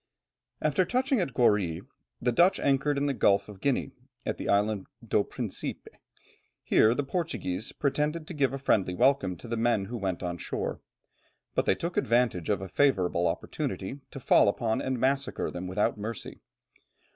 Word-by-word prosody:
After 155 +4 +3
touching 255 - +1
at 170 -7 -1
Goree, 100 -9 +2 0.4
the 125 - +1
Dutch 175 +10 +4
anchored 140 +1 +1
in 140 - +1
the 140 - +1
Gulf 100 -5 +3
of 100 -2 -12
Guinea, 135 0 0 0.3
at - - -2
the - - -4
Island 100 -1 +1 0.2
do - - +3
Principe. - - -5 0.7
Here 110 +2 +4
the 145 - 0
Portuguese 135 - -3
pretended 150 +3 -1
to 175 - -7
give 140 -5 +1
a 135 - -3
friendly 100 -9 +1
welcome 120 -7 +2
to - - -11
the 115 0 -2
men 115 -3 +2
who 120 +4 -5
went 95 -3 -3
on 85 -1 -3
shore, - - -4 0.7
but - - 0
they - - +4
took 170 - -4
advantage 115 -7 +1
of 100 -3 +1
a - - -5
favourable 90 -9 +2
opportunity, 95 +7 -3
to 135 - -8
fall 125 - +5
upon 110 +2 0
and 130 -2 -2
massacre 135 +2 0
them 90 +1 -5
without 105 +4 0
mercy. 110 +1 -6
120 Hz, 170 wpm, -28 LUFS, 100-140 Hz, 0.7 s, fall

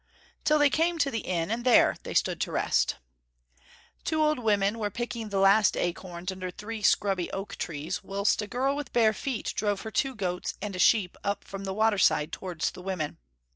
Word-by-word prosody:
Till 305 - +4
they 290 -1 +4
came 335 +2 +1
to 285 -3 +1
the 225 - -1
inn, 175 -2 -2
and 235 +1 -2
there 250 -2 +5
they - - -7
stood - - +1
at - - -3
rest. - - +1 1.1
Two 315 -1 +1
old 305 -3 +2
women 210 -1 +1
were 210 -2 -1
picking 230 0 -4
the 200 - -2
last 195 +2 +5
acorns 175 +1 -3
under 185 -1 -5
three 210 +4 -7
scrubby 195 -3 +2
oak 195 +1 -5
trees, 160 +5 -4
whilst 200 +3 +1
a 210 - -5
girl 260 +6 0
with 290 -3 -6
bare 220 -2 +4
feet 250 +1 -3
drove 205 -2 0
her 220 - -6
two 270 +3 0
goats 180 -4 -3
and 200 -1 -5
a - - -5
sheep 195 -3 +4
up 200 0 -2
from 195 0 -7
the 190 - -3
water 215 -1 +2
side 150 -3 +3
towards 175 -4 -3
the - - -11
women. 180 -5 -4
205 Hz, 205 wpm, -28 LUFS, 185-235 Hz, 1.1 s, there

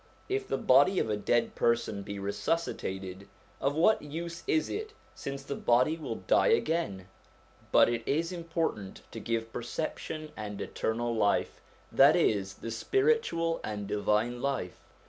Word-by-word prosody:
If 400 +1 -2
the - - 0
body 190 - +5
of 110 - +1
a - - +2
dead 115 +3 +1
person 115 -3 +1
be 100 +1 -6
resuscitated, 100 - -3 0.3
of 140 +1 0
what 175 +7 +4
use 170 +3 -6
is 155 - +2
it 435 +1 -5 0.2
since 140 0 -6
the 140 - -4
body 125 +5 +3
will 160 - -6
die - - +4
again? 165 - +1 0.6
But - - +7
it 120 -1 -1
is 165 +5 0
important 165 - -3
to - - -6
give 115 -1 -2
perception 155 +4 -4
and 105 -2 -6
eternal 120 +1 -2
life, 105 -2 +1 0.3
that - - +7
is, 95 -2 +1
the 115 - -6
spiritual 380 - +1
and 105 -1 -4
divine 105 +4 0
life. 135 -10 -2
120 Hz, 145 wpm, -30 LUFS, 105-165 Hz, 0.6 s, But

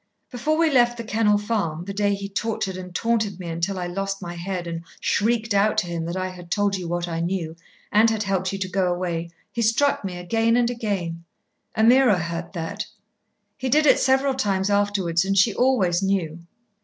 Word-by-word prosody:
Before 295 +5 0
we 325 -1 +3
left 240 -2 +3
The 230 - -5
Kennel 215 -2 +2
Farm, 205 -6 -2
the 200 - -5
day 205 0 +1
he 200 0 -5
tortured 200 -1 -2
and 180 0 -7
taunted 220 -4 0
me 175 -2 -6
until 170 +4 -2
I 180 - -3
lost 195 +2 -3
my 175 -2 -6
head 175 +1 -4
and 165 -1 -5 0.2
shrieked 220 0 +1
out 200 +2 +3
to - - +2
him 170 -1 -3
that 170 +2 -3
I 185 0 -2
had 175 -2 -11
told 205 +1 +1
you 180 -3 -5
what 175 +1 -2
I 165 -1 -3
knew, 170 -2 -2 0.4
and 220 +2 +5
had 220 -1 -1
helped 190 -1 -1
you 195 - -3
to 195 -1 -3
go 185 -1 0
away, 170 -2 -2 0.2
he 235 - -2
struck 230 +5 +2
me 185 -2 -4
again 225 +6 +1
and 240 0 +2
again. 195 -8 -3 0.5
Ameerah 235 -1 +5
heard 170 0 -4
that. 165 -3 -4 0.7
He 260 -1 -2
did 305 +4 +4
it - - +6
several 265 +1 +3
times 205 -6 0
afterwards, 200 -4 +1
and 195 +1 0
she 200 +3 +5
always 200 -9 +2
knew. 170 -4 -1
195 Hz, 205 wpm, -23 LUFS, 175-225 Hz, 0.7 s, it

